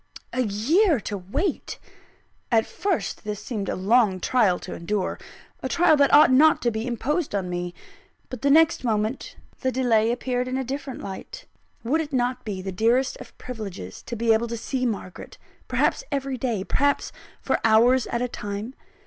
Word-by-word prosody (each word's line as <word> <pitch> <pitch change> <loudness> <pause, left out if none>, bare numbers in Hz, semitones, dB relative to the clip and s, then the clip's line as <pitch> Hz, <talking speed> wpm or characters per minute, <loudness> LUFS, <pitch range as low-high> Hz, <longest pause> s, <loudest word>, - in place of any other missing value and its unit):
A 255 - +1
year 270 - +2
to 205 - -4
wait! 245 - -3 0.7
At 225 -1 +4
first, 390 -4 -2
this 210 -1 -4
seemed 210 -2 -4
a - - -1
long 200 0 +3
trial 210 -5 +2
to 180 - -8
endure, 185 +3 -2 0.4
a 260 - -3
trial 340 -1 +4
that 280 -1 +4
ought 295 -2 +7
not 305 +5 +6
to 240 - +2
be 220 +2 -3
imposed 270 +3 -1
on 185 -2 -2
me. 175 0 -4 0.5
But 255 - -8
the 280 - +2
next 320 +1 +4
moment, 220 +1 -1 0.2
the 260 - 0
delay 235 -3 +2
appeared 250 0 -2
in 255 +1 -2
a 265 - -1
different 270 +1 -5
light. - - -8 0.4
Would 290 +8 +1
it 300 -2 -7
not 250 0 0
be 195 -4 -5
the 190 - -4
dearest 235 +7 +2
of - - -13
privileges 200 - -7
to 235 - -4
be 230 0 +3
able 225 +2 +1
to 235 0 -4
see 255 +2 -2
Margaret, 195 -5 -6 0.3
perhaps - - +1
every 275 -1 -2
day, 235 -6 -2
perhaps 285 +7 0 0.3
for - - 0
hours 235 +3 +4
at 235 +1 -2
a - - 0
time? 210 +1 -6
240 Hz, 180 wpm, -24 LUFS, 210-265 Hz, 0.7 s, ought